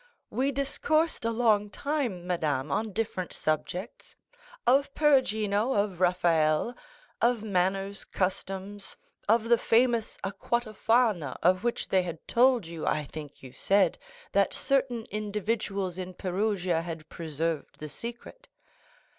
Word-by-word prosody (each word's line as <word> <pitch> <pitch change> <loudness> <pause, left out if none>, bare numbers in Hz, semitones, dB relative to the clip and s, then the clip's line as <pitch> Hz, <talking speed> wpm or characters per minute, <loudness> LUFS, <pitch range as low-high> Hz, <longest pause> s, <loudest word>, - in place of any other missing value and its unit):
We 270 +2 +1
discoursed 295 +2 0
a - - +2
long 220 -3 +2
time, 250 - -2
madame, 150 -6 -1
on 215 +6 0
different 190 -4 -2
subjects; 175 +7 -3 0.5
of 275 +3 +4
Perugino, 225 -6 +3
of 200 -3 0
Raphael, 175 +2 +2 0.5
of 235 -2 +2
manners, 195 0 0
customs, 195 +1 -3 0.3
of 225 +1 +5
the 235 0 +5
famous 235 -1 +2
aqua 205 +4 -1
Tofana, 215 - +1
of 185 +2 +4
which 240 0 -1
they 190 - +3
had 170 -2 -5
told 245 -3 +4
you, 165 -1 -7
I 150 - +1
think 145 -1 -9
you 130 -1 -10
said, 195 +3 +2 0.3
that - - +2
certain 255 -5 0
individuals 205 -3 -2
in 185 0 -6
Perugia 185 -3 0
had 165 -2 -7
preserved 160 -1 -3
the 155 - -6
secret." 235 - -8
200 Hz, 125 wpm, -28 LUFS, 175-235 Hz, 0.5 s, of